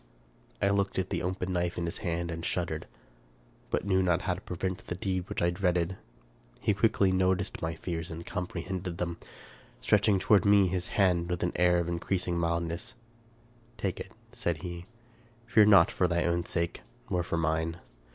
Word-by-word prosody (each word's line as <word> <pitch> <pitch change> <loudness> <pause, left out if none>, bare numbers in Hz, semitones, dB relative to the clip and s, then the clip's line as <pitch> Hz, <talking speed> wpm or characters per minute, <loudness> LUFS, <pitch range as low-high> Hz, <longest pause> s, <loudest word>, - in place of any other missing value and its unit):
I 100 - +4
looked 100 0 0
at 95 - -1
the 85 - -1
open 90 0 -2
knife 90 -1 -1
in 85 - -1
his 85 +3 -3
hand 85 -3 -2
and 85 0 -5
shuddered, 85 -3 -2 0.8
but - - -1
knew 95 -2 +3
not 90 -1 +2
how 95 - +1
to 90 - -8
prevent 95 +1 -4
the 90 - -3
deed 95 0 -2
which - - -2
I 85 - +3
dreaded. 90 -1 0 0.6
He 105 - +2
quickly 100 -1 +3
noticed 95 +1 +1
my 80 0 -2
fears, 80 0 -4
and 85 +1 -7
comprehended 90 -1 -4
them. 85 -1 -3 0.6
Stretch 105 - +3
ing 100 - +4
toward 100 +2 +4
me 100 -1 +6
his 90 0 -1
hand, 90 -3 +2
with 90 -1 -1
an 85 - +1
air 90 0 +4
of 85 -1 0
increasing 90 +1 -1
mildness, 85 +1 -2 0.4
" 115 0 -31
Take - - -2
it," - - -7 0.2
said 85 -2 -2
he; 85 0 -6 0.3
" 115 0 -30
fear 110 -2 +5
not 95 -5 +7
for 90 - +2
thy 85 -1 +1
own 85 0 0
sake, 85 -1 -2 0.3
nor 90 - +2
for 85 -1 -2
mine. 80 0 0
90 Hz, 190 wpm, -29 LUFS, 85-95 Hz, 0.8 s, not